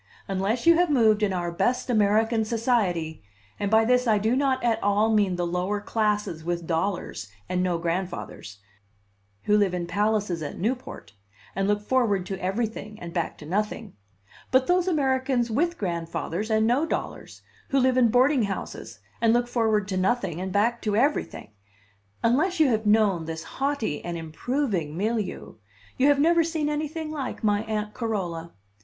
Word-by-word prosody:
Unless 195 - -1
you 335 - +8
have 355 -1 +3
moved 220 -6 +4
in 210 -2 +2
our 175 -2 -2
best 240 +9 0
American 220 0 +2
society 215 - 0 0.4
(and 200 - -1
by 220 +1 +4
this 250 +1 +2
I 215 -2 +4
do 220 +4 +1
not 265 -2 +1
at 230 -2 +1
all 205 +2 +2
mean 200 -4 +2
the 175 0 -1
lower 180 +4 -1
classes 210 -6 -1
with 170 0 -3
dollars 165 - -2 0.2
and 180 0 -1
no 180 -2 0
grandfathers, 170 - -4 0.9
who 210 - +3
live 200 -3 +2
in 175 -1 -2
palaces 205 -2 0
at 150 - -5
Newport, 235 - -4 0.4
and 195 0 0
look 205 0 0
forward 210 -6 +1
to 190 0 -5
every 195 +6 0
thing 215 -1 -8
and 170 -1 -8
back 170 -3 -2
to 150 - -11
nothing, 210 +4 -2 0.6
but 260 0 +3
those 360 +2 +2
Americans 260 -6 +1
with 340 +9 0
grandfathers 170 +2 -3
and 220 0 +2
no 245 +6 +2
dollars, 325 - -5 0.3
who 275 - +1
live 260 0 +3
in 255 -2 +5
boarding 255 +1 +3
houses, 195 -1 -6 0.2
and 230 -1 +4
look 240 0 +2
forward 220 -4 +1
to 190 - -1
nothing 190 -3 0
and 190 0 -4
back 230 +5 +1
to 210 -2 -1
everything) 270 - 0 0.7
unless 310 +11 +2
you 305 -4 +5
have 220 -2 0
known 210 -6 +3
this 160 0 -5
haughty 270 - -2
and 175 -1 -4
improving 170 - -2
milieu, 210 - -3 0.4
you 265 - +3
have 290 -1 +5
never 335 +3 +4
seen 315 -2 -1
anything 305 +1 -3
like 280 -5 -5
my 205 -1 +2
Aunt 210 -1 -3
Carola. 180 -8 -3
215 Hz, 170 wpm, -25 LUFS, 185-250 Hz, 0.9 s, you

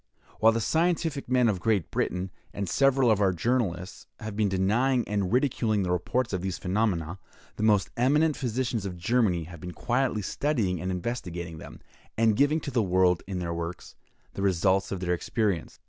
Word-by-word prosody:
While 110 +1 +6
the 115 - 0
scientific 160 -1 0
men 125 -2 +4
of 100 -5 0
Great 100 -3 0
Britain, 90 +1 -2 0.2
and 100 -1 -3
several 135 +2 +3
of 105 -1 +2
our 95 -2 +4
journalists, 95 -2 -2
have 110 -2 -6
been 105 -1 +1
denying 115 +7 +1
and 100 -3 -1
ridiculing 120 -5 +1
the 90 - -1
reports 110 +7 -1
of 95 - -1
these 95 -1 -3
phenomena, 95 -3 -1 0.4
the - - -4
most 105 -3 +3
eminent 150 +5 +3
physicians 125 -4 -2
of 90 -2 -6
Germany 95 -3 +1
have 85 +1 -11
been 90 +2 -7
quietly 120 -2 0
studying 105 - -1
and 90 - -3
investigating 90 -4 -4
them, - - -11 0.4
and 110 -1 +3
giving 145 +6 +3
to 140 - -5
the 120 -3 +2
world, 90 -2 +2
in 95 -2 -4
their 85 -1 -3
works, 85 +1 -6 0.4
the - - -5
results 95 0 +2
of 95 -2 -3
their 90 -1 0
experience. 100 0 -1
100 Hz, 180 wpm, -27 LUFS, 90-125 Hz, 0.4 s, While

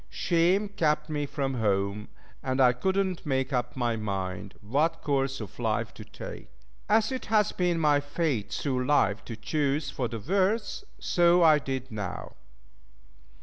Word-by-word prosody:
Shame 175 - +2
kept 155 -5 0
me 145 -1 -1
from 135 -1 -2
home, 100 -2 0 0.3
and 130 0 -2
I 125 -2 +6
could 190 +10 -1
not 190 -3 0
make 135 -2 -1
up 125 -1 -1
my 120 -3 0
mind 95 -2 -4
what 140 +11 0
course 135 -2 0
of 110 -5 -9
life - - -1
to - - -10
take. - - -9 0.4
As 220 +2 +3
it 260 - -4
has 210 -2 +3
been 175 -2 0
my 150 -2 +4
fate 145 -6 -2
through 130 -3 -1
life 110 -8 +2
to 115 - -6
choose 140 +5 -1
for 125 - -2
the 115 - -5
worst, 195 - 0
so 175 0 +4
I 155 -2 +6
did 130 -2 -4
now. 105 -4 -5
140 Hz, 160 wpm, -28 LUFS, 120-170 Hz, 0.4 s, I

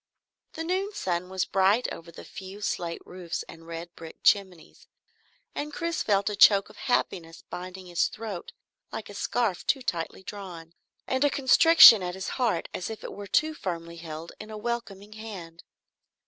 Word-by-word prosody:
The 325 - -4
noon 375 +4 -1
sun 180 - -2
was 190 -1 -1
bright 195 +5 +3
over 170 0 -10
the - - -11
few 195 +2 -9
slate 170 -4 -3
roofs 180 -2 -5
and 165 0 -13
red 170 +1 -7
brick 165 -1 -10
chimneys, 190 -5 +1 0.7
and 295 +1 -4
Chris 335 +2 -2
felt 200 -2 +2
a 210 - 0
choke 200 -1 +6
of - - -19
happiness 165 -8 -1
binding 185 +1 -7
his 175 -1 +1
throat 215 -6 -7 0.4
like - - -6
a - - -10
scarf 225 -7 -1
too 270 -3 +2
tightly 170 -1 -3
drawn, 180 -5 -8 0.3
and 260 +1 0
a 290 - +5
constriction 275 - +8
at 180 0 -3
his 190 - -4
heart 230 -10 0
as 180 - -4
if 220 - -7
it - - -6
were 205 0 -8
too 310 +11 +2
firmly 170 - -5
held 165 0 -8
in 215 - -9
a 215 - -7
welcoming 210 -3 -5
hand. 190 -7 -9
190 Hz, 175 wpm, -27 LUFS, 170-225 Hz, 0.7 s, constriction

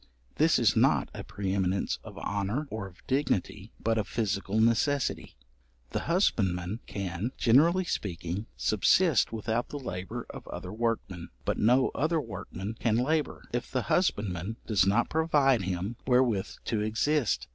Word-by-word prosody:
This - - +4
is - - +3
not - - +3
a - - -6
pre 95 -2 -3
eminence 95 -1 0
of - - -11
honour 105 +9 -2
or 110 -3 -4
of 90 -2 -18
dignity, 110 -6 -1
but 115 0 +1
of 105 - -2
physical 100 -1 -1
necessity. 115 +5 +1 0.6
The - - -2
husbandman 100 - +1
can, 100 +4 -3
generally 165 +10 +4
speaking, 95 - -3
subsist 145 - +3
without 115 +1 -2
the 145 - -5
labour 90 -9 -5
of - - -10
other - - -6
workmen; 110 -6 -2 0.2
but - - 0
no 125 +4 +4
other 160 +3 0
workmen 105 - -6
can 115 -2 +2
labour, 150 +5 0
if 120 - -2
the 130 -2 -1
husbandman 105 - 0
does 100 -4 +3
not 110 +4 +3
provide 145 -6 +3
him 95 +4 -3
wherewith 125 -6 +3 0.2
to 110 -2 0
exist. 110 - +1
110 Hz, 145 wpm, -29 LUFS, 95-130 Hz, 0.6 s, This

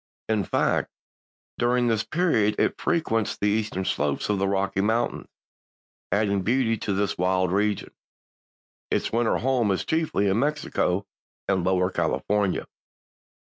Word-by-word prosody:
In 110 -2 +1
fact, - - +1 0.7
during 120 +1 +2
this 115 -2 +1
period 115 - +1
it - - 0
frequents 115 - 0
the - - -2
eastern 105 -3 -1
slopes 75 0 -1
of 105 -2 +1
the 100 - +1
Rocky 95 0 0
Mountains, 115 +3 0 0.8
adding 100 -1 +1
beauty 115 +2 +1
to 100 - -2
this 100 -1 -1
wild 95 0 +1
region. 105 +1 0 1.0
Its - - 0
winter 115 0 +2
home 125 -3 +1
is 95 - 0
chiefly 160 -11 0
in 100 +3 +2
Mexico 135 -9 0 0.4
and 95 -2 +1
Lower 90 0 +1
California. 100 0 0
105 Hz, 135 wpm, -25 LUFS, 95-115 Hz, 1.0 s, during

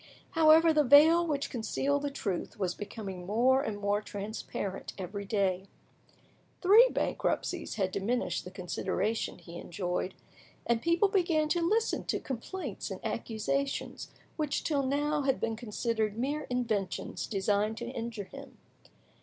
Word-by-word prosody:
However, 320 0 +6
the 305 -1 +4
veil 315 +6 +7
which 285 -3 -1
concealed 280 +4 0
the 285 - -1
truth 200 -10 -4
was 185 -3 -1
becoming 200 -3 -7
more 250 +6 +4
and 215 -6 -3
more 205 0 0
transparent 205 -2 -5
every 200 +2 -5
day. 195 -2 0 1.0
Three 430 +7 +8
bankruptcies 360 -7 -1
had 190 -3 0
diminished 225 +6 -1
the - - -8
consideration 190 +4 -2
he 170 0 -10
enjoyed, 180 +1 -3 0.5
and 235 -1 +1
people 335 - +3
began 340 -6 +2
to 345 +2 +1
listen 435 +7 +1
to - - -1
complaints 270 - -5
and 190 - -5
accusations 235 +5 -2 0.3
which 300 -3 -1
till 290 -3 +1
now 290 +2 0
had 270 -1 +1
been 225 -1 -1
considered 220 -1 -2
mere 285 +5 -2
inventions 220 -7 -2
designed 205 +1 0
to 235 - -4
injure 230 -4 -4
him. 275 +7 -12
235 Hz, 135 wpm, -30 LUFS, 200-295 Hz, 1.0 s, Three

